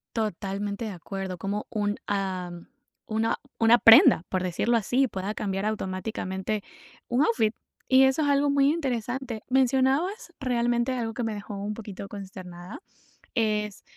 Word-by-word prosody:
Totalmente 205 0 -2
de 215 - -4
acuerdo, 190 0 -6
como 200 +4 -3
un, 205 -2 -1
ah, 190 -3 -2 0.6
una 220 +1 0 0.2
una 230 +1 +6
prenda, 225 -6 +8
por 185 - 0
decirlo 185 +6 0
así, 250 +5 +2
pueda 195 -1 -4
cambiar 195 0 -2
automáticamente 190 0 -3 0.4
un 250 +4 +1
outfit, 225 -3 +1 0.3
y 260 0 +6
eso 265 +4 +3
es 290 - +1
algo 285 0 +3
muy 280 0 +4
interesante. 250 -5 -3
Mencionabas, 270 - +1
realmente, 240 -1 +1
algo 230 -3 -2
que 240 - -3
me 225 -1 -2
dejó 205 0 -7
un 205 +2 -3
poquito 205 -3 -8
consternada, 185 -2 -9 0.6
es, 210 -3 0
220 Hz, 140 wpm, -26 LUFS, 195-250 Hz, 0.6 s, prenda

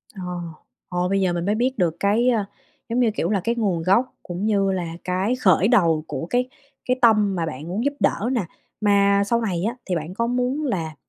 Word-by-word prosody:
Ồ, 190 - -7 0.7
ờ, 180 0 0
bây 195 0 +1
giờ 185 -2 +1
mình 175 0 -2
mới 205 +2 +1
biết 255 +4 0
được 170 -5 +1
cái, 220 +5 +2
ơ, 220 -5 +1 0.4
giống 235 +2 0
như, 230 -3 +3
kiểu, 175 -5 -2
là 205 -2 +1
cái 235 +4 0
nguồn 195 -8 0
gốc 215 +9 +2
cũng 180 +3 -4
như 200 -2 +2
là 185 -2 -2 0.2
cái 185 +6 0
khởi 195 -6 +3
đầu 170 -10 +3
của - - -4
cái 250 +1 0 0.4
cái 250 0 +1
tâm 210 -4 +4
mà 170 -2 -1
bạn 155 0 -6
muốn 195 +7 -2
giúp 285 - +1
đỡ 225 - +1
nè. 240 -6 0 0.4
Mà 200 -1 +4
sau 235 +3 +1
này 185 -6 -2
á 230 +4 -1
thì 185 - -1
bạn 165 +2 -4
có 230 +4 -1
muốn 250 +5 -1
là 165 - -2
200 Hz, 225 wpm, -23 LUFS, 180-235 Hz, 0.7 s, tâm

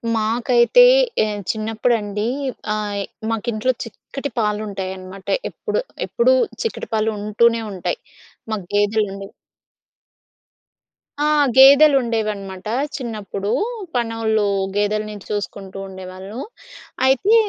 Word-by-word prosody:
మాకైతే 235 - +4 0.4
ఏ - - +2 0.3
చిన్నప్పుడండి 215 -1 -1 0.5
ఆహ్, 210 -1 -2 0.3
మాకు 225 +1 -2
ఇంట్లో 230 +4 +1
చిక్కటి 275 +4 -7
పాలు 210 -1 0
ఉంటాయి 190 -2 -4
అన్నమాట. 185 +1 -11 0.2
ఎప్పుడు - - -3 0.3
ఎప్పుడు - - +3 0.3
చిక్కటి 455 - -3
పాలుంటూనే 220 +2 +2
ఉంటాయి. 195 - -3 0.5
మాకు 205 -4 -3
గేదెలు 205 +1 +2
ఉండేవి. 195 +1 -8 1.9
ఆ! 295 - +3 0.3
గేదెలుండేవనమాట 230 -9 +5 0.3
చిన్నప్పుడు. 210 -5 -4 0.4
పనోళ్ళు 225 -2 +1 0.3
గేదెలని 210 +1 0
చూసుకుంటూ 200 -2 -5
ఉండేవాళ్ళు. 190 +3 -8 0.7
అయితే 270 - +4
215 Hz, 90 wpm, -20 LUFS, 205-235 Hz, 1.9 s, గేదెలుండేవనమాట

